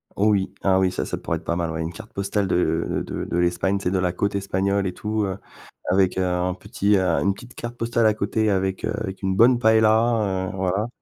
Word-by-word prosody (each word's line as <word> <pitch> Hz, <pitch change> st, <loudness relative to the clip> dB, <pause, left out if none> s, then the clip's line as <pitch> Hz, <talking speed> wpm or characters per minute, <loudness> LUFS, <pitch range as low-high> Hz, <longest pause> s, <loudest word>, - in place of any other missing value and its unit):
Oh 105 Hz, +2 st, +3 dB
oui. 100 Hz, -2 st, 0 dB
Ah 95 Hz, -1 st, +3 dB
oui 95 Hz, -1 st, +2 dB
ça, 90 Hz, -, -3 dB
ça -, -, -4 dB
pourrait 85 Hz, -, -2 dB
être 80 Hz, -, -12 dB
pas 85 Hz, -, -1 dB
mal 85 Hz, -1 st, -2 dB
ouais, 80 Hz, 0 st, -3 dB
une 80 Hz, +1 st, -3 dB
carte -, -, -11 dB
postale 100 Hz, 0 st, -1 dB
de 85 Hz, -2 st, 0 dB
de -, -, -4 dB
de -, -, -3 dB
l'Espagne, 90 Hz, +3 st, +1 dB
tu 100 Hz, -, -7 dB
sais, 90 Hz, -, 0 dB
de 95 Hz, -, +1 dB
la 90 Hz, -1 st, 0 dB
côte 100 Hz, +2 st, -1 dB
espagnole 100 Hz, 0 st, 0 dB
et 90 Hz, -, -4 dB
tout 105 Hz, +2 st, -2 dB
heu, 95 Hz, -1 st, -3 dB, 0.5 s
avec, 95 Hz, 0 st, +2 dB
heu, 95 Hz, -, +2 dB
un 90 Hz, 0 st, 0 dB
petit, 105 Hz, +1 st, 0 dB
heu, -, -, +2 dB
une 95 Hz, +2 st, +1 dB
petite 120 Hz, +5 st, -14 dB
carte 120 Hz, 0 st, -6 dB
postale 115 Hz, 0 st, +1 dB
à 110 Hz, -, +5 dB
côté 110 Hz, +1 st, 0 dB
avec, 95 Hz, -1 st, -1 dB
heu, -, -, -1 dB
avec 95 Hz, -3 st, -5 dB
une 95 Hz, 0 st, 0 dB
bonne 120 Hz, +4 st, +5 dB
paella, 110 Hz, -3 st, +3 dB
heu, -, -, -9 dB
voilà. 95 Hz, +3 st, -1 dB
95 Hz, 250 wpm, -23 LUFS, 90-105 Hz, 0.5 s, à